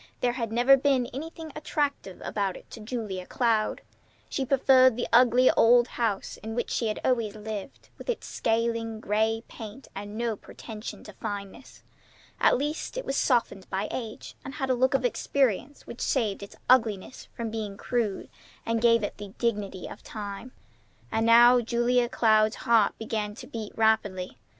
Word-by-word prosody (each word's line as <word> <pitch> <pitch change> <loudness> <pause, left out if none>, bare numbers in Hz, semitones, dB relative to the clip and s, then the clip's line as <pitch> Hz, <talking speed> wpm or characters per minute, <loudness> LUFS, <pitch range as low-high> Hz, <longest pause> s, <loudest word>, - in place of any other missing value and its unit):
There 245 - +2
had 230 -3 -3
never 245 +4 +6
been 270 -2 +2
anything 320 +3 -7
attractive 290 -9 -2
about 200 -3 -1
it - - -16
to - - -9
Julia 210 -5 -5
Cloud. 225 -3 +1 0.5
She 270 - -1
preferred 260 -1 +5
the 245 - -2
ugly 250 +1 +6
old 240 +1 +5
house 220 -5 -2
in 220 +1 -7
which 240 - -2
she 230 - 0
had 215 - -2
always 230 -5 +1
lived, 215 +2 -7
with - - -9
its 480 - -2
scaling 225 -1 -1
gray 220 +2 0
paint 220 +4 -10
and 205 +2 -7
no 230 -1 -1
pretensions 215 +1 -9
to 210 - -10
fineness. 200 +6 -7 0.6
At - - +4
least 300 - -3
it - - -3
was 270 - -2
softened 230 -8 +1
by 195 +2 -2
age, 225 -4 -6
and 270 - -7
had 265 -3 -1
a - - +4
look 255 +2 +2
of 260 -2 +1
experience 265 +2 0
which 235 - -9
saved 220 -8 0
its 200 - -10
ugliness 225 -3 +2
from 230 -2 -4
being 210 -3 -4
crude, 220 -4 -2 0.4
and 230 0 0
gave 230 -2 +4
it 205 - -3
the 205 -2 -9
dignity 205 -5 -2
of - - -9
time. 205 +3 -7 0.6
And 225 +1 +1
now 240 +2 +7
Julia 240 +1 +1
Cloud's 215 -3 +3
heart 225 -3 +4
began 215 -2 -3
to - - -9
beat 220 -2 -7
rapidly. 205 - +1
230 Hz, 170 wpm, -27 LUFS, 210-250 Hz, 0.6 s, now